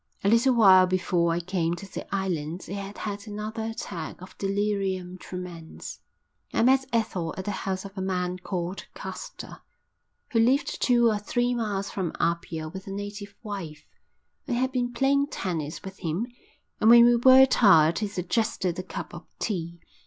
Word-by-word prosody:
A 200 - +3
little 240 +3 +4
while 190 -5 +7
before 180 -2 +1
I 165 - 0
came 175 -1 -1
to 185 +3 -9
the - - -7
island 175 -3 -2
he - - -7
had 200 0 -6
had 205 0 -5
another 215 +2 -4
attack 190 -7 -6
of 185 +1 -12
delirium 195 -2 -1
tremens. 175 -3 -8 0.5
I - - +2
met 265 +2 +4
Ethel 195 -8 -1
at 190 - -5
the 205 - -1
house 190 -1 -3
of 195 0 -10
a 190 - -4
man 180 -1 -2
called 180 0 -4
Caster, - - -8 0.7
who 230 - +2
lived 270 +6 +2
two 240 -2 +4
or 215 -2 +2
three 245 +4 0
miles 205 -4 -2
from 185 -5 -3
Apia 170 -1 -1
with 190 +4 -9
a - - -5
native 205 0 -6
wife. 190 -8 -6 0.6
I 255 - -1
had 255 +2 +1
been 245 -2 -1
playing 275 +3 +2
tennis 160 - -4
with 190 0 -9
him 170 +5 -2 0.5
and 220 - +5
when 235 0 +9
we 240 0 +6
were 260 +2 +8
tired 170 -11 +5
he 210 - -1
suggested 185 -1 -1
a - - -3
cup 190 - -7
of - - -10
tea. 170 -5 -3
195 Hz, 175 wpm, -26 LUFS, 180-225 Hz, 0.7 s, when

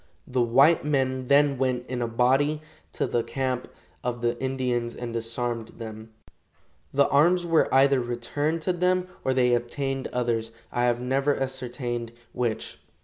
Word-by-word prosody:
The 125 0 0
white 135 +8 +5
men 130 -3 0
then 140 -1 +4
went 125 -2 0
in 125 -1 -4
a 120 - 0
body 135 +6 +2 0.3
to - - 0
the 120 - 0
camp 125 +2 -2 0.4
of 120 -1 -3
the 120 0 +1
Indians 125 -3 -1
and 120 -1 -5
disarmed 115 0 -2
them. 110 -1 -8 0.8
The 140 0 +4
arms 175 +5 +4
were 165 -2 +3
either 135 0 +5
returned 125 +7 -2
to 180 +3 0
them 180 +1 +1 0.2
or 130 - +1
they 125 -1 +3
obtained 135 +3 -1
others, 115 -2 -1 0.2
I 120 0 +1
have 120 -1 +2
never 135 +3 +1
ascertained 125 -3 -4 0.2
which. 120 -3 -3
125 Hz, 150 wpm, -26 LUFS, 120-140 Hz, 0.8 s, white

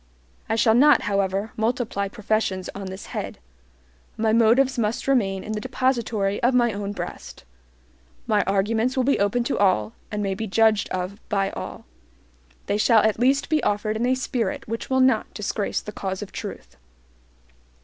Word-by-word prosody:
I - - +1
shall 225 0 +4
not, 280 +3 +5
however, 200 +1 -1
multiply 225 -3 -1
professions 200 -2 -2
on 195 -1 -6
this 190 +1 -7
head. - - -5 0.8
My 220 0 +1
motives 240 +3 +4
must 220 +3 -1
remain 195 -8 +1
in 215 - -6
the 210 -1 -3
depository 235 -6 0
of 250 +2 +3
my 240 -2 +3
own 200 0 -4
breast. 205 - -7 0.8
My 210 -1 +2
arguments 220 +6 +1
will 260 - +3
be 275 +2 +2
open 205 +5 +1
to 260 - -2
all, 115 - +2 0.2
and 210 -1 -3
may 195 -1 -1
be 220 +3 -4
judged 215 0 +3
of 185 +3 -4
by 195 -2 0
all. - - -7 0.8
They 205 - 0
shall 220 -1 +5
at 220 0 +1
least 270 +3 +2
be 310 0 +1
offered 210 +1 0
in 235 +3 0
a 255 - +3
spirit 260 +2 -2
which 230 +1 -5
will 260 0 +3
not 260 0 +2
disgrace - - -2
the - - -7
cause 190 +1 -4
of 200 - -10
truth. - - -8
220 Hz, 170 wpm, -24 LUFS, 200-245 Hz, 0.8 s, not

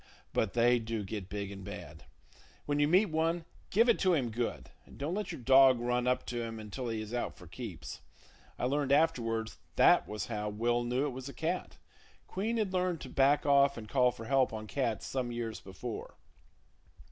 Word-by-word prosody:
but 110 - 0
they 120 +1 +4
do 115 -1 -3
get 100 -1 -6
big 100 -1 -4
and 100 -1 -8
bad. 100 +2 -9 0.6
When 145 0 0
you 145 - +4
meet 185 +3 +4
one, 165 +1 0 0.2
give 230 +5 +4
it 235 - +4
to 185 -2 +4
him 125 -6 -1
good, 120 +1 -3
and - - -16
don't 145 +5 -2
let 205 0 -2
your 165 - -7
dog 130 0 +6
run 125 +1 0
up 125 0 +1
to 120 -1 -3
him 115 -1 -5
until 110 +4 -5
he 110 -1 -2
is 110 +2 -7
out 120 - -2
for 90 - -13
keeps. 95 +2 -8 0.6
I - - -1
learned 140 +1 0
afterwards 115 -7 +1 0.2
that - - +5
was 105 0 -4
how 105 -2 -3
Will 120 +3 0
knew 125 +4 0
it - - 0
was 130 +1 -7
a - - -10
cat. 170 +3 -3 0.5
Queen 220 +5 -2
had 210 -4 -1
learned 180 -2 0
to - - -7
back 140 +2 +3
off 140 -1 +4
and 110 -2 -7
call 125 +1 +4
for 115 -2 -8
help 135 +1 +3
on 110 -1 -5
cats 115 -1 -2
some 125 -2 -2
years 115 -2 -4
before. 100 +4 -7
125 Hz, 205 wpm, -32 LUFS, 115-145 Hz, 0.6 s, dog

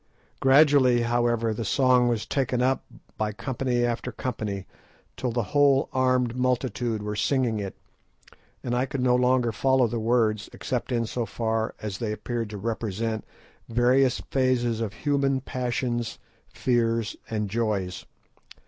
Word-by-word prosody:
_" - - -35
Gradually, 135 -3 +5
however, 120 -1 +1
the 115 - -4
song 125 +2 +3
was 115 -2 0
taken 130 -2 0
up 130 0 +1 0.4
by 105 -1 0
company 120 +2 -1
after 120 +1 -2
company, 110 -5 -4 0.5
till 125 - -2
the 120 0 0
whole 140 -2 +4
armed 130 -2 +2
multitude 125 -3 -1
were 105 0 -3
singing 120 -1 +1
it, 100 -2 -5 0.9
and 120 - -2
I 125 +2 +1
could 135 0 -3
no 125 -1 +3
longer 125 -1 +2
follow 130 +3 +3
the 115 0 -2
words, 110 -2 +1
except 125 0 -3
in 115 -1 +1
so 115 +1 -3
far 110 -1 -2
as 100 -3 -4
they 110 -2 -2
appeared 115 +1 -3
to 105 - -6
represent 110 0 -3 0.4
various 125 +2 +3
phases 120 -4 +1
of 105 -3 -3
human 140 -2 +2
passions, 120 -2 -2 0.3
fears, 115 -2 0
and 105 -2 -1
joys. 100 -4 -2
120 Hz, 145 wpm, -26 LUFS, 110-130 Hz, 0.9 s, Gradually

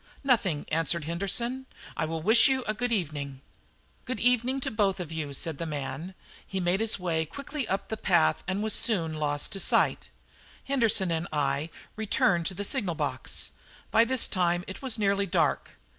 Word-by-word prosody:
"Nothing," 205 - +1
answered 165 +1 +1
Henderson; 235 - -1 0.3
"I 155 - -1
will 160 0 -4
wish 225 - +7
you 265 -1 +1
good 240 +3 -2
evening." 145 - -2 0.7
"Good 255 -3 -3
evening 250 +2 +2
to - - -2
you - - -11
both," 165 -8 -1
said 160 -4 -3
the 165 - -3
man. 150 +4 -5 0.3
He 195 - -4
made 180 +1 +1
his 225 0 +2
way 170 -4 -1
quickly 280 - -5
up 195 - -2
the 220 - -3
path 80 - +2
and 190 +3 -1
was 220 -1 0
soon 170 -8 +2
lost 145 -1 -1
to 195 - -2
sight. - - +2 0.5
Henderson 230 -9 +2
and 165 +1 -1
I 145 +1 0
then - - -17 0.2
returned 195 -5 +2
to 190 - -4
the 205 +2 -2
signal 200 -8 0
box. - - -2 0.4
By 225 - +6
this 255 +1 +2
time 175 -2 0
it 190 - -8
was 260 -4 0
nearly 200 -1 +1
dark. 175 -2 +1
190 Hz, 175 wpm, -28 LUFS, 160-225 Hz, 0.7 s, wish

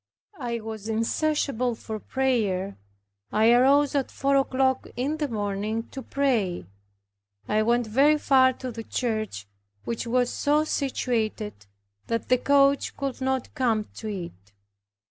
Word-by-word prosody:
I 235 -3 -3
was 220 -1 -6
insatiable 250 +1 0
for 220 -1 -6
prayer. 210 -8 0 0.6
I 220 +2 +4
arose 275 +4 +5
at 280 -2 0
four 275 0 0
o'clock 265 -1 +1
in 280 +5 -1
the 300 -2 -1
morning 210 0 -2
to 270 - -7
pray. 235 - 0 0.8
I 215 +1 +2
went 235 +2 +2
very 275 +8 +4
far 260 -3 +4
to 255 0 -6
the 225 0 -7
church, 215 - -3 0.4
which 235 0 -4
was 245 +1 +1
so 295 +1 +2
situated, 225 - -2 0.4
that 230 -1 -2
the 255 0 +4
coach 280 +1 +3
could 275 -1 -4
not 265 -1 -1
come 230 -7 0
to 220 - -6
it. 170 - -7
245 Hz, 135 wpm, -26 LUFS, 215-270 Hz, 0.8 s, arose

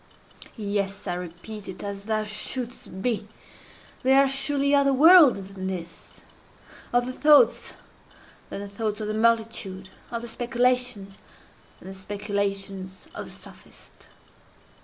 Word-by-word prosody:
Yes! 200 -2 -2
I 180 - -2
repeat 180 +4 -8
it—as 200 +1 -7
thou 215 0 0
shouldst 215 -2 -5
be. 225 -4 -1 0.7
There 265 +1 +5
are 275 - +5
surely 275 +1 +1
other 280 -1 +4
worlds 275 - +6
than 190 -1 -5
this—other 190 +7 -6
thoughts 295 - +4 0.7
than 200 - -5
the 205 - -6
thoughts 210 +1 -3
of 215 - -3
the 215 - -2
multitude—other 225 -1 -1
speculations 245 -4 -1 0.6
than - - -14
the - - -7
speculations 195 -1 -4
of - - -6
the - - -12
sophist. - - -15
210 Hz, 115 wpm, -25 LUFS, 195-250 Hz, 0.7 s, worlds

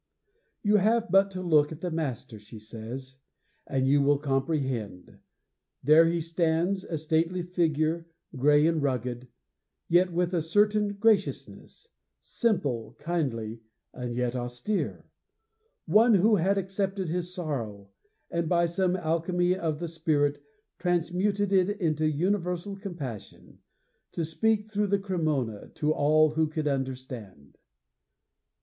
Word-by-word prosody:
You 210 0 +4
have 225 +3 +2
but 195 +1 +5
to 185 -1 -6
look 155 -4 +3
at 160 0 -8
the 180 - -3
master, 135 -9 -4
she 105 +2 -13
says, 120 +5 -8 0.5
and 130 -1 0
you 140 +1 +4
will 145 +1 +3
comprehend. 135 - -2 0.6
'There 155 +4 +6
he 170 0 0
stands, 170 +3 0
a 160 - -4
stately 165 +3 0
figure, 165 -2 0 0.3
gray 145 +3 +4
and 165 -1 +2
rugged, 125 -2 -2 0.6
yet 180 +2 +3
with 175 +1 0
a 170 - +1
certain 205 +5 +2
graciousness; 215 - -1 0.3
simple, 130 - -1
kindly, 115 -10 -3 0.3
and 125 -2 -5
yet 125 0 -1
austere; 125 +12 -3 0.8
one 225 +1 +5
who 210 +3 +4
had 195 +3 +1
accepted 195 0 -2
his 175 +2 -3
sorrow, 115 - -5 0.4
and, 170 -1 -1
by 170 -1 +3
some 180 +2 0
alchemy 175 +1 0
of 160 -5 -2
the 170 - -3
spirit, 155 -3 0 0.4
transmuted 185 +3 0
it 190 -1 +3
into 155 -3 +1
universal 180 +3 -1
compassion, 170 - -8 0.5
to 165 - -2
speak, 215 +6 0
through 210 0 0
the 200 +1 +2
Cremona, 155 - -2
to 150 0 +1
all 155 +1 +4
who 160 +1 +1
could 155 0 -3
understand!' 130 - -5
165 Hz, 130 wpm, -27 LUFS, 135-185 Hz, 0.8 s, There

